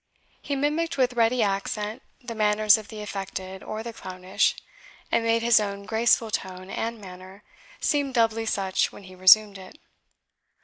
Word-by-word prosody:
He 285 - -3
mimicked 295 +3 -1
with 255 -2 +2
ready 235 0 +2
accent 210 +3 -2 0.2
the 235 -1 -6
manners 215 -1 +4
of 220 -2 -6
the 215 -2 -8
affected 190 -2 -6
or 215 +1 -6
the 235 0 -7
clownish, 185 -2 -1 0.6
and 230 - +2
made 230 0 +1
his 235 -1 +5
own 200 -1 -4
graceful 225 +1 +2
tone 185 -1 -5
and 230 0 -3
manner 190 0 -12 0.4
seem 285 -2 0
doubly 225 -2 +1
such 190 -3 0
when - - -13
he 185 0 -13
resumed 195 +2 +5
it. 185 +8 -13
215 Hz, 160 wpm, -25 LUFS, 195-230 Hz, 0.6 s, his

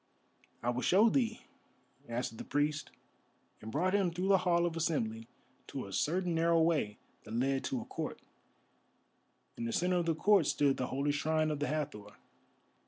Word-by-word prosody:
"I 120 - +1
will 125 +1 -2
show 205 - +5
thee," 230 -3 0 0.7
answered 115 -1 -4
the - - -4
priest, 145 0 -1 0.7
and 110 - -7
brought 180 +8 +1
him 200 -3 +3
through 180 +3 -2
the 195 -1 +6
Hall 175 -1 +2
of 170 -1 -2
Assembly 115 -9 -1 0.4
to - - -5
a 100 - -9
certain 175 - 0
narrow 165 0 +3
way 160 -11 +1 0.3
that 110 +1 -7
led 135 +2 +1
to 130 - -2
a - - -8
court. - - -5 1.4
In 115 - -3
the 115 - -2
centre 180 +7 +1
of 170 -1 0
the 165 - +2
court 195 -2 +4
stood 140 -2 +2
the 125 - -2
holy 140 +2 0
shrine 155 +1 +1
of 150 - -3
the 145 - -1
Hathor. 145 -10 -4
155 Hz, 175 wpm, -33 LUFS, 130-175 Hz, 1.4 s, the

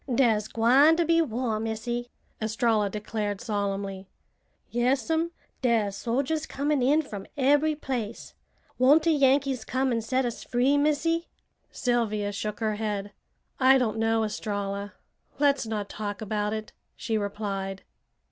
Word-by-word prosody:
"Dar's 225 -4 +3
gwine 260 +9 +5
to 340 0 +1
be 330 +1 +4
war, 240 -6 -1
Missy!" 225 +2 -3 0.3
Estralla 220 -1 +1
declared 210 0 -3
solemnly. 200 -3 -3 0.6
"Yas'm. 275 +7 +1 0.3
Dar's 225 -6 +1
soldiers 280 +8 -1
comin' 285 0 0
in 295 +5 +3
from 205 -8 -8
ebery 290 +3 +3
place. 245 -7 -5 0.5
Won't 285 +5 +6
de 335 - +3
Yankees 275 -3 +2
come 260 0 0
and 230 -1 0
set 260 +3 0
us 235 - -4
free, 255 +3 +2
Missy?" 305 +3 +1 0.4
Sylvia 215 -4 0
shook 210 +2 -4
her 215 -1 0
head. 205 -2 -3 0.5
"I 265 0 +6
don't 225 -4 0
know, 225 0 +2
Estralla! 205 -1 -3 0.4
Let's 280 -4 +2
not 210 -2 -3
talk 205 -1 -5
about 210 -1 -2
it," 215 0 -5 0.2
she 225 - -3
replied. 200 -2 -3
230 Hz, 135 wpm, -27 LUFS, 210-270 Hz, 0.6 s, Won't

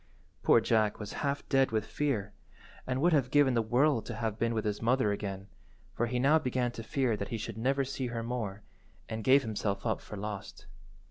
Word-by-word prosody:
Poor - - +6
Jack 110 -2 +2
was 105 -1 -6
half 140 -1 -2
dead 135 -1 +3
with 110 -1 -1
fear, 110 -9 -2 0.5
and 130 0 -1
would 175 0 +4
have 135 -5 +2
given 145 -2 +4
the 115 - +3
world 120 +2 +2
to 120 - -6
have 110 -1 -3
been 115 0 +1
with 110 0 -1
his 105 -1 -2
mother 115 -2 +2
again, 95 -1 -4 0.5
for 120 - 0
he 125 +2 -2
now 140 +6 +4
began 125 -4 -1
to 115 - -7
fear 125 0 0
that 100 -1 -4
he 115 - -2
should 110 0 -5
never 135 +3 +1
see 130 -1 -3
her 115 -1 -4
more, 110 -4 -4 0.4
and 110 0 -4
gave 135 +3 +5
himself 100 -2 -2
up 110 - 0
for 105 - -9
lost. 105 0 -6
115 Hz, 210 wpm, -31 LUFS, 110-130 Hz, 0.5 s, Poor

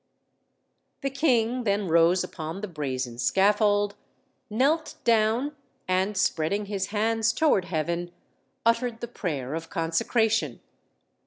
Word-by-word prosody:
The 275 -1 -2
king 250 -4 +1
then 200 -2 0
rose 170 +2 +4
upon 165 +1 -6
the 210 - -3
brazen 130 -7 -4
scaffold, 205 - +3 0.6
knelt 280 +9 +1
down, 230 +5 +2 0.3
and 190 +2 0
spreading 190 +3 0
his 195 -2 -2
hands 225 +1 +1
toward 240 - +2
heaven, 170 +1 -2 0.5
uttered 230 0 +1
the 235 - -3
prayer 150 - -4
of 160 0 -5
consecration. 215 +7 0
205 Hz, 110 wpm, -26 LUFS, 170-230 Hz, 0.6 s, rose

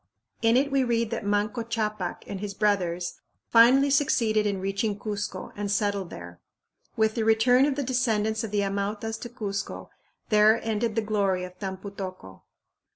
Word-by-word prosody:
In 230 +1 +4
it 280 +2 +1
we 275 -1 +3
read 230 -2 0
that 225 -3 -3
Manco 205 +3 0
Ccapac 215 -5 -3
and 195 - -6
his 200 0 -5
brothers 180 -4 0 0.3
finally 260 +5 +6
succeeded 225 -7 +2
in 200 -2 -1
reaching 195 +2 -1
Cuzco 205 -1 -5
and 205 -1 -3
settled 200 -3 0
there. 85 0 -10 0.6
With 220 0 +2
the 225 - -1
return 245 +5 +4
of 285 - 0
the 285 - -2
descendants 225 -4 0
of 225 - -3
the 205 0 0
Amautas 205 +3 -3
to 240 - -7
Cuzco 210 -5 -5 0.4
there 215 +1 +5
ended 225 0 -1
the 225 - +1
glory 200 -4 0
of 180 0 -9
Tampu 195 0 -5
tocco. 185 - -8
215 Hz, 165 wpm, -26 LUFS, 200-230 Hz, 0.6 s, finally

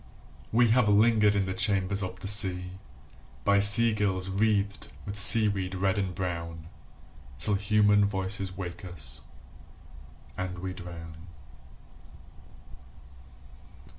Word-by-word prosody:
We 120 +1 +2
have 120 -2 +2
lingered 105 0 +3
in 100 -1 0
the 95 - -4
chambers 95 0 0
of 95 -1 -7
the 95 - -7
sea 95 -3 +2 0.7
By 100 0 +2
sea 105 +3 +5
girls 95 -3 -1
wreathed 100 0 -2
with 100 0 -6
seaweed 100 -3 +5
red 95 +1 -1
and 95 -3 -4
brown 85 -3 -6 0.7
Till 105 +9 -1
human 105 0 +2
voices 95 -1 -3
wake 90 -2 -8
us, 75 -8 -7 1.1
and 90 -1 -6
we 95 +1 -6
drown. 85 -2 -11
95 Hz, 110 wpm, -26 LUFS, 90-105 Hz, 1.1 s, sea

